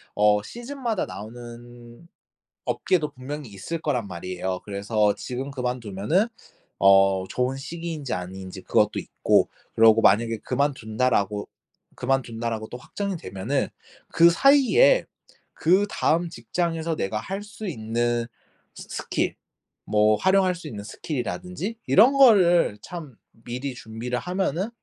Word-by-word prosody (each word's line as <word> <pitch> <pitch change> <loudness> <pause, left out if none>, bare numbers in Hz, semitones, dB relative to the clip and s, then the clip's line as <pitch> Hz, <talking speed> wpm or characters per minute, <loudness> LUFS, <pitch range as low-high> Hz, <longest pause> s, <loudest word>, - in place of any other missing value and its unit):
어 105 0 +4
시즌마다 240 - -3
나오는 120 +4 -11 0.6
업계도 155 -5 0
분명히 140 0 -7
있을 105 - -5
거란 125 -9 -1
말이에요. 90 +1 -4
그래서 105 +1 +1
지금 130 +3 -5
그만두면은 125 - -1 0.5
어 95 -1 +5
좋은 125 +1 -1
시기인지 160 - -5
아닌지 95 +1 -6
그것도 - - +2
있고 - - +1 0.3
그러고 115 0 +6
만약에 115 +3 +3
그만둔다라고 110 -6 0 0.5
그만둔다라고 115 -4 -2
또 125 - -7
확정이 195 +8 -4
되면은 95 - -2 0.4
그 170 +1 +6
사이에 285 - +5 0.5
그다음 175 -2 +2
직장에서 165 -1 -2
내가 105 -4 -2
할 195 - -5
수 210 0 -8
있는 120 -4 -1 0.5
스 - - -10
스킬 - - -1 0.5
뭐 105 0 +3
활용할 190 -1 +3
수 165 -2 -9
있는 105 -8 -7
스킬 140 +7 -5
이라든지 180 - -4
'이런 230 +8 +6
거를 190 - +5
참 160 -8 -8 0.2
미리 125 +4 -6
준비를 120 +2 -4
하면은 185 - -1
125 Hz, 285 characters per minute, -25 LUFS, 110-175 Hz, 0.6 s, 그러고